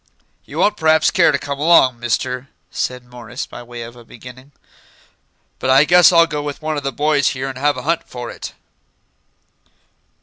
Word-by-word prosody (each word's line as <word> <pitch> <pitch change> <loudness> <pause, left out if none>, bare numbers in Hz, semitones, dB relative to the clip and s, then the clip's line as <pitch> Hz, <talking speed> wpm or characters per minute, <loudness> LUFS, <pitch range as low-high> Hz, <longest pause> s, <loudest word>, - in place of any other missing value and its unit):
"You - - -10
won't 210 - +2
p'raps 160 0 +3
care - - +4
to 140 - 0
come 140 0 -6
along, 145 -6 +4
Mister," 125 +3 -2 0.2
said 125 -1 -4
Morris, 125 -2 -8
by - - -11
way 120 -1 -9
of 115 +1 -11
a 120 - -14
beginning; 125 +4 -14 1.1
"but 130 - -2
I 135 +2 +6
guess 175 +2 +6
I'll 170 -1 +6
go 150 -3 -4
with 145 -1 -6
one 155 0 -3
of 145 - -3
the 135 0 -3
boys 145 -1 +1
here 130 +1 -3
and 135 -1 -6
have 145 +1 +1
a - - -6
hunt 165 +2 -1
for 120 -1 -7
it." - - -9
135 Hz, 190 wpm, -18 LUFS, 125-155 Hz, 1.1 s, I